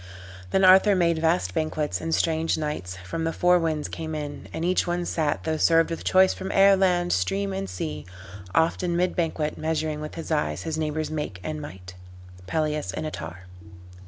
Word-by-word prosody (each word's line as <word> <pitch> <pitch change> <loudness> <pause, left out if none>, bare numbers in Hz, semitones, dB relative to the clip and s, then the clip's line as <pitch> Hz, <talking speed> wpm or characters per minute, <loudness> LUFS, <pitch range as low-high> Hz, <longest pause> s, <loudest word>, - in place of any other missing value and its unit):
"Then 190 - +2
Arthur 190 +2 +7
made 170 -3 +2
vast 90 - +1
banquets, 155 +1 -1
and 165 0 0
strange 160 0 +1
knights 150 - -4
From 165 - -3
the 165 - 0
four 180 +1 +3
winds 155 -3 -1
came 160 -1 -5
in: 145 -1 -6
and 165 - -3
each 180 0 +1
one 175 0 -1
sat, 155 -4 -1
Tho' 160 -1 -1
served 165 +1 +4
with 165 - -4
choice 190 0 +4
from 190 +1 -5
air, 195 0 +6
land, 180 -2 +2
stream 95 +2 0
and 95 0 -4
sea, 75 -4 -5 0.5
Oft 165 +3 +2
in 175 -2 0
mid 180 +1 +1
banquet 160 -3 -1
measuring 155 -1 -1
with 150 - -7
his 165 0 -6
eyes 150 -1 0
His 160 -1 -3
neighbor's 155 0 -2
make 150 -12 -4
and 155 -1 -4
might." 90 -10 -9 0.5
Pelleas 150 - -1
and 155 - -4
Ettarre. 90 - -7
160 Hz, 190 wpm, -25 LUFS, 150-170 Hz, 0.5 s, Arthur